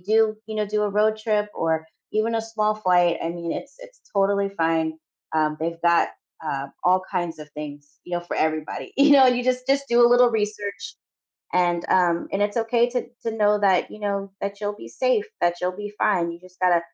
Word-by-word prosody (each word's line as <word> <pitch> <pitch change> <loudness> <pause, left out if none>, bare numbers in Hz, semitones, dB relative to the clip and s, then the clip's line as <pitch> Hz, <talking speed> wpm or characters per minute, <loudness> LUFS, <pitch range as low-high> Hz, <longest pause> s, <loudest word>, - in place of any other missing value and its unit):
do, 220 +1 +3
you 220 - -6
know, 215 0 0
do 210 +1 0
a - - 0
road 215 +1 +2
trip 215 -1 -1
or 160 -1 0 0.3
even 220 +2 0
a 225 - +1
small 215 -1 0
flight, 180 -4 +3
I 165 - -1
mean, 170 -1 -5
it's - - -7
it's - - -14
totally 200 0 +2
fine. 165 -3 0 0.4
Um, 155 -1 +1
they've 165 +1 -3
got, 170 0 +3 0.3
uh, 140 -2 -3 0.2
all 185 +1 +4
kinds 175 -4 -2
of 150 - -11
things, 145 -1 -9
you 175 - -11
know, 175 - -2
for 175 - -5
everybody, 155 -1 -2
you 285 +1 +5
know? 270 -2 +8
You 245 0 +2
just 255 0 0
just 275 0 +1
do 235 0 +4
a - - +5
little 245 0 +6
research 205 -2 -3 0.6
and, 175 -1 +1
um, 175 -2 +2
and 195 - -1
it's 205 +2 -1
okay 235 +1 +2
to 250 0 -3 0.2
to 230 - 0
know 210 -1 +3
that 190 -3 +3
you 215 - -10
know, 200 -1 -2
that 200 +1 -4
you'll 205 0 -2
be - - -10
safe, - - +1
that 175 0 +2
you'll 180 +1 0
be 205 0 -6
fine. 175 -5 +2
You 170 - -8
just 185 0 -19
gotta 180 -2 +4
200 Hz, 215 wpm, -24 LUFS, 170-220 Hz, 0.6 s, know